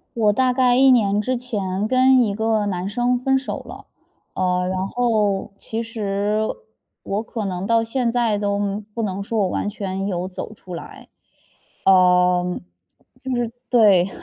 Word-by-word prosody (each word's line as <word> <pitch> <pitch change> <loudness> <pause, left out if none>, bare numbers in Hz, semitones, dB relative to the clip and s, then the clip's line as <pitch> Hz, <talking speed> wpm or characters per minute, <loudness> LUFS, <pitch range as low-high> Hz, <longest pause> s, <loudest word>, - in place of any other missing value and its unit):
我 215 -2 +3
大 255 +3 +2
概 250 -1 +3
1 265 +1 +6
年 210 -5 +3
之 255 +4 -1
前 205 -5 -2
跟 260 +2 +4
一 215 -5 +1
个 220 0 0
男 185 -1 -2
生 245 +3 +1
分 265 +2 +1
手 270 - -5
了。 - - -11 0.5
呃， 180 -1 0
然 185 0 -2
后， 215 -4 0
其 225 +3 -5
实 210 -1 -1 0.6
我 200 +2 -2
可 225 -1 -5
能 185 -1 -3
到 230 +2 +2
现 240 +1 -1
在 230 -3 +1
都 205 0 -1
不 230 - -3
能 200 -2 -3
说 220 +3 -3
我 195 - +2
完 205 - -2
全 195 -2 -4
有 180 -2 -2
走 190 +3 -7
出 185 -4 -10
来。 170 - -10 0.8
呃， 180 -1 +5
就 180 - -2
是 - - -5 1.1
对， 200 -7 +5
210 Hz, 170 characters per minute, -21 LUFS, 195-235 Hz, 1.1 s, 1